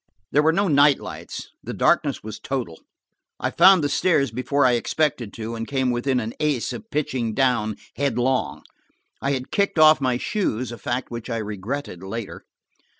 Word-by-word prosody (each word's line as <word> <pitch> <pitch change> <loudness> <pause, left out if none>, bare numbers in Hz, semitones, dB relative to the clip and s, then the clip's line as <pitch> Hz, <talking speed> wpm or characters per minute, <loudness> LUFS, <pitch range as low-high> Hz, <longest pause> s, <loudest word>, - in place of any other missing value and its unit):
There 145 - +4
were 160 +1 +4
no 195 +4 +1
night 145 -2 +5
lights; - - -8
the - - -6
darkness - - +2
was 110 0 -7
total. 120 -12 -4 0.6
I - - -1
found 190 -4 +6
the - - +2
stairs 145 - +2
before 130 +4 +1
I 125 - +5
expected 120 -2 0
to, 115 +1 -5
and 115 0 -5
came 130 -2 0
within 125 +2 0
an 115 0 -4
ace 150 -6 0
of 225 - -9
pitching 130 -7 -2
down, 120 -5 +1 0.2
headlong. 130 -2 0 0.6
I 140 +1 0
had 130 -1 -4
kicked 200 -3 0
off 155 -1 +7
my 130 -2 +1
shoes–a 125 - -2
fact 120 +6 -3
which 120 +1 -6
I 115 - -1
regretted 105 +1 -5
later. 100 +3 -6
130 Hz, 170 wpm, -23 LUFS, 115-145 Hz, 0.6 s, off